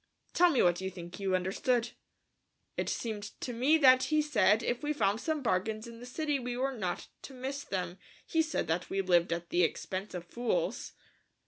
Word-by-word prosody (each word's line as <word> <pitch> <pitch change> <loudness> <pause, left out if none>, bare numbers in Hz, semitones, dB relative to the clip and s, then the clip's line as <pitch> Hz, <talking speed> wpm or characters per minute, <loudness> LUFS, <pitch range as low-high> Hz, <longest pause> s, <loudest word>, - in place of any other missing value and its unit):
"Tell 355 0 +6
me 280 -7 +3
what 175 0 +3
you 190 - -2
think 175 0 -9
you 190 -2 +1
understood." 230 +6 0 0.8
"It - - -1
seemed 210 -3 -4
to 245 - -4
me 265 +7 +4
that 260 -3 +6
he 310 -1 +2
said 215 -8 +3
that - - -5
if 240 - -1
we 300 0 0
found 215 -6 +1
some 310 -3 -1
bargains 215 +1 0
in 230 -1 -10
the 245 - -9
city 295 +2 -1
we 245 -1 -4
were 270 +1 -1
not 185 -6 -3 0.2
to 270 - -10
miss 270 +3 -4
them. 180 -1 -4 0.3
He 325 - +2
said 320 0 -1
that 165 +3 -1
we 195 - 0
lived 175 -2 +3
at 170 0 -3
the 175 - +3
expense 185 +3 -2
of 175 -1 -5
fools." 245 - -2
230 Hz, 205 wpm, -31 LUFS, 185-270 Hz, 0.8 s, Tell